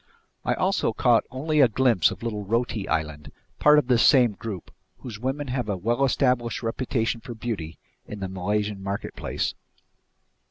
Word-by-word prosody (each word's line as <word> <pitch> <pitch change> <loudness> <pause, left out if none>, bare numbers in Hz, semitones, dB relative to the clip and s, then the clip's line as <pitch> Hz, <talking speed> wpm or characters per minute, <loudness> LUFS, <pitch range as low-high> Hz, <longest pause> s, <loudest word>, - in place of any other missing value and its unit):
I - - 0
also - - +1
caught - - +3
only 150 +4 +1
a 130 - +7
glimpse 115 -6 +3
of - - -8
little 105 -3 -3
Roti 115 0 -1
Island, 75 -1 -2 0.3
part 150 0 +6
of 150 - +3
this 120 -2 +3
same 125 -5 +6
group, 100 -2 -7 0.3
whose 115 -5 -8
women 135 +3 -3
have 125 -4 -2
a 100 - -1
well 120 +8 0
established 125 -3 +1
reputation 115 0 -1
for 120 -1 -8
beauty 105 -8 -5 0.3
in 105 - -7
the 95 - -3
Malaysian 100 +2 -2
marketplace. 100 +1 -3
115 Hz, 160 wpm, -25 LUFS, 100-125 Hz, 0.3 s, a